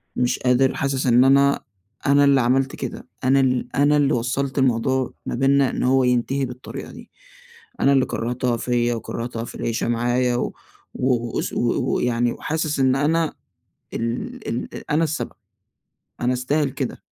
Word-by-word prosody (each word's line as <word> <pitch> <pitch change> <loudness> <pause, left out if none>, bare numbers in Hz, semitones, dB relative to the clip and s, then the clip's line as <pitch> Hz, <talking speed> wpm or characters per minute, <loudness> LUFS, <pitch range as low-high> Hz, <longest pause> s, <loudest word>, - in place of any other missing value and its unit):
مش 125 0 0
قادر 130 +1 +2
حاسس 135 -1 -1
إن 125 0 +5
أنا 140 +1 +4 0.5
أنا 140 +1 +5
اللي 140 -1 +5
عملت 130 +2 +1
كده، - - -6 0.2
أنا 135 +2 +4
ال 125 -1 0
أنا 145 +2 +4
اللي 145 -1 +2
وصّلت 130 +3 -1
الموضوع 130 0 +1
ما - - -3
بيننا 135 +1 +3
إن - - -3
هو 130 +1 +3
ينتهي 125 +2 +1
بالطريقة 125 +1 -8
دي. - - -13 0.7
أنا 140 - +4
اللي 135 -2 +3
كرّهتها 120 +1 -2
فيّا 120 0 0
وكرّهتها 115 0 -5
في - - -10
العيشة 115 0 -2
معايا 120 +1 +1
و - - -2 0.4
و 120 -2 -1
واس - - -2
و 120 +2 0
ويعني 120 0 +1
وحاسس 155 -2 -2
إن 130 0 +3
أنا 160 +3 +1 0.6
ال 215 - -4
ال 115 - -4
أ - - -7
أنا 165 +2 +3
السبب. 155 -1 -3 0.9
أنا 125 +1 +1
أستاهل 140 +3 0
كده. - - -5
130 Hz, 160 wpm, -22 LUFS, 120-140 Hz, 0.9 s, إن